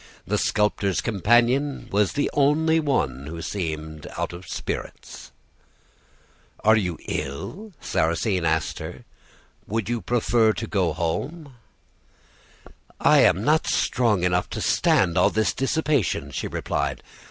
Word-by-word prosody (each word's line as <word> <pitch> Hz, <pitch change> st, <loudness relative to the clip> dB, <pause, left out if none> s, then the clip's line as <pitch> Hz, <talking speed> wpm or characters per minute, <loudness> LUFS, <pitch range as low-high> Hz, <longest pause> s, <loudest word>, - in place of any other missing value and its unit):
The 105 Hz, +2 st, 0 dB
sculptor's 105 Hz, -2 st, +1 dB
companion 120 Hz, +7 st, +2 dB
was 105 Hz, 0 st, +2 dB
the 145 Hz, -, 0 dB
only 155 Hz, +3 st, +3 dB
one 75 Hz, -, -1 dB
who 85 Hz, +2 st, -6 dB
seemed 80 Hz, -5 st, -5 dB
out -, -, -2 dB
of 85 Hz, +1 st, -10 dB
spirits. -, -, -6 dB, 1.3 s
"'Are 110 Hz, +1 st, +6 dB
you 90 Hz, -6 st, -1 dB
ill?' 75 Hz, -, -5 dB
Sarrasine 85 Hz, +4 st, 0 dB
asked 80 Hz, -1 st, 0 dB
her. -, -, -8 dB, 0.6 s
'Would 110 Hz, +1 st, -2 dB
you 120 Hz, -1 st, -1 dB
prefer 115 Hz, +1 st, +2 dB
to 115 Hz, -, -4 dB
go 95 Hz, -7 st, 0 dB
home?' 135 Hz, -, -3 dB, 1.5 s
"'I -, -, +5 dB
am 95 Hz, -, +4 dB
not 155 Hz, +5 st, +2 dB
strong 110 Hz, -7 st, +1 dB
enough 90 Hz, 0 st, +1 dB
to -, -, -5 dB
stand 85 Hz, -3 st, +2 dB
all -, -, +5 dB
this 110 Hz, 0 st, 0 dB
dissipation,' 135 Hz, -, 0 dB
she -, -, -3 dB
replied. -, -, -3 dB
105 Hz, 125 wpm, -24 LUFS, 85-130 Hz, 1.5 s, Are